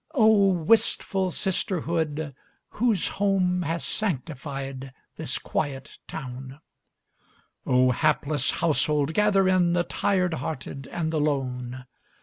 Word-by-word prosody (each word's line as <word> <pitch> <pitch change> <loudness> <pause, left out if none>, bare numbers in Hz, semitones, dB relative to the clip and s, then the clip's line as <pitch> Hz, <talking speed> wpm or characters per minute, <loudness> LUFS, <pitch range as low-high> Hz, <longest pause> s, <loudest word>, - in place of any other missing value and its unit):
Oh, 215 -5 +5
wistful 190 +1 +2
sisterhood, 165 -5 -1 0.4
whose 225 -5 +1
home 190 -3 +1
Has 165 0 -2
sanctified 135 -7 -4 0.2
this - - -2
quiet 140 -3 -4
town! 130 +1 -7 1.1
Oh, 125 0 +4
hapless 150 +1 +1
household, 150 -2 +1
gather 200 0 +3
in 180 -2 +3
The 175 0 +2
tired 180 -1 0
hearted 140 -4 -5
and 160 -2 -3
the 155 - +1
lone! 130 -3 -2
160 Hz, 105 wpm, -26 LUFS, 135-185 Hz, 1.1 s, Oh